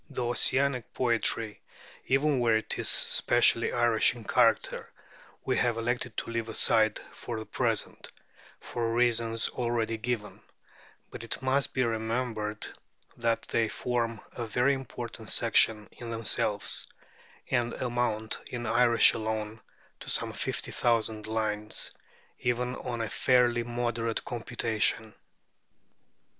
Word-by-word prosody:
The 125 - -3
Ossianic 125 +1 +1
poetry, 115 -3 0 0.5
even 135 +1 +2
where 115 -2 +3
it 110 - -4
is - - +2
specially - - +4
Irish 120 -1 +3
in 120 - -10
character, - - +1 0.5
we - - +1
have 120 -2 +1
elected 120 0 -2
to - - -3
leave 115 -1 -3
aside 110 -1 +2
for 120 - -6
the 110 - -6
present, 115 -4 -2 0.5
for 115 -1 -3
reasons 115 -1 +2
already 115 -2 -1
given; 115 -2 -3 0.7
but - - -8
it 115 - -3
must 135 +1 +1
be 130 - +2
remembered 110 -2 -2 0.5
that 115 -1 0
they 115 -1 0
form 115 -1 -2
a 120 -2 -5
very 125 +5 +2
important 120 -4 -6
section 105 -2 +3
in 120 - -9
themselves, 110 -2 0 0.6
and 120 -2 +1
amount 120 -3 -1
in 120 -1 -5
Irish 120 +1 +5
alone 110 0 -3 0.4
to - - -9
some - - +1
fifty - - -3
thousand 110 -2 0
lines, 105 -1 -2 0.5
even 125 +1 -1
on 120 -2 -4
a 115 - -1
fairly 120 +2 +3
moderate 120 -1 -2
computation. 115 -2 -1
115 Hz, 125 wpm, -29 LUFS, 110-120 Hz, 0.7 s, Irish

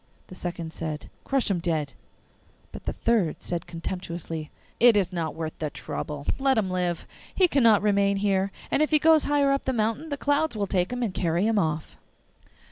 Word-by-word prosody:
The - - -10
second 170 -3 -5
said, 155 -2 -5
'Crush 270 -6 +1
him 180 - +1
dead.' 160 -5 -1 0.8
But - - -10
the - - -2
third 215 -9 +1
said 175 -1 -3
contemptuously, 165 -2 -5 0.3
'It 235 -3 +7
is 190 -2 +1
not 165 -3 -2
worth 160 -1 -4
the 155 - -2
trouble! 145 -1 -6
Let 270 -2 +3
him 195 -4 +1
live; 180 -2 -1 0.3
he 370 - +5
cannot 230 - +4
remain 200 -1 +3
here, 195 -1 +1 0.2
and - - +2
if 305 - +3
he 310 - +5
goes 315 0 +5
higher 285 -1 +3
up 275 - 0
the 265 - 0
mountain 225 +7 -1
the 285 - -3
clouds 290 -2 +1
will 205 - 0
take 185 0 0
him 250 0 -2
and 210 -5 -1
carry 175 +1 0
him 220 -1 +2
off. 155 -3 -2
195 Hz, 195 wpm, -26 LUFS, 170-245 Hz, 0.8 s, It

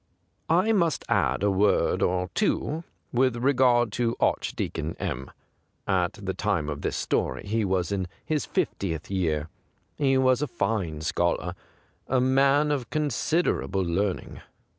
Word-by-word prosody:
I 185 +7 +3
must 170 -8 +1
add - - +1
a 100 - +3
word 100 +2 +2
or 90 +1 0
two 165 -6 0 0.3
with 130 0 +3
regard 125 -3 +3
to 115 +1 0
Archdeacon - - -1
M. 65 +2 -4 0.6
At 90 -1 +1
the 95 -2 -4
time 95 -8 -1
of 70 0 -6
this - - -2
story - - -1
he 110 +2 0
was 95 -1 0
in 95 -2 -1 0.2
his 155 -2 -1
fiftieth 85 -3 -2
year. 80 -5 0 0.5
He 135 -2 +3
was 130 0 +3
a 150 - 0
fine 100 - -2
scholar, 85 +2 0 0.5
a 130 - +2
man 135 +3 +3
of 135 -5 -2
considei'able 150 - 0
learning. 95 +3 -2
105 Hz, 140 wpm, -26 LUFS, 90-135 Hz, 0.6 s, I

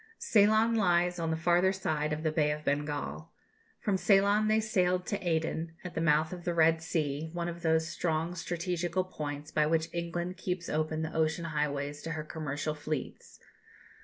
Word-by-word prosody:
Ceylon 220 - +4
lies 180 -4 +2
on 165 -1 -1
the 160 - 0
farther 175 +3 +3
side 155 -6 -1
of 150 +1 -2
the 155 - +1
Bay 150 -1 +2
of 150 0 -3
Bengal. 145 - -2 0.5
From 200 -2 0
Ceylon 200 +2 +4
they 215 +1 +4
sailed 185 -4 +1
to 205 - -2
Aden, 165 -1 -1
at 180 - -6
the 165 - -2
mouth 155 +1 +3
of 175 -1 -8
the 175 0 -1
Red 165 0 +4
Sea, 155 -2 -2
one 175 0 -2
of 170 0 -6
those 160 -1 +2
strong 165 0 -1
strategical 175 +1 -2
points 150 -4 -6
by 150 -1 +2
which 160 +1 0
England 175 +1 -3
keeps 180 -2 -3
open 155 +1 -1
the 160 - -4
ocean 160 +1 0
highways 145 -2 -2
to 165 - -4
her 155 0 -4
commercial 155 -1 -3
fleets. 150 -2 -5
165 Hz, 180 wpm, -30 LUFS, 155-180 Hz, 0.5 s, Ceylon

